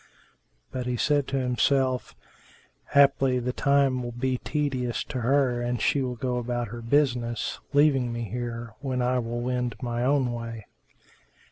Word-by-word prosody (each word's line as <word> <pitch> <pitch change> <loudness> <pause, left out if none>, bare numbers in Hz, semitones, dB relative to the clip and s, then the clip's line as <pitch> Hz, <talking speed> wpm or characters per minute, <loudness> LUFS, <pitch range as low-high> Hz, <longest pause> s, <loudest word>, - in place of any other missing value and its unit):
But 125 -1 -4
he 125 -1 -1
said 145 +1 +2
to 135 - -1
himself, 130 0 +1 0.8
"Haply 135 -2 +5
the 125 0 -2
time 140 -2 +2
will 120 0 -4
be 125 +1 -1
tedious 130 -5 -1
to 130 -4 -5
her 125 -1 +2
and 120 0 -1
she 140 - +2
will 125 -1 -2
go 125 +1 -2
about 120 -1 -2
her 120 +2 -7
business, 120 -2 0
leaving 140 -4 +3
me 120 0 -3
here, 115 0 -5
when 130 -3 -1
I 125 +1 +2
will 120 0 -3
wend 125 -2 -1
my 120 0 -2
own 130 -2 +2
way." 115 -2 -6
125 Hz, 155 wpm, -26 LUFS, 120-135 Hz, 0.8 s, Haply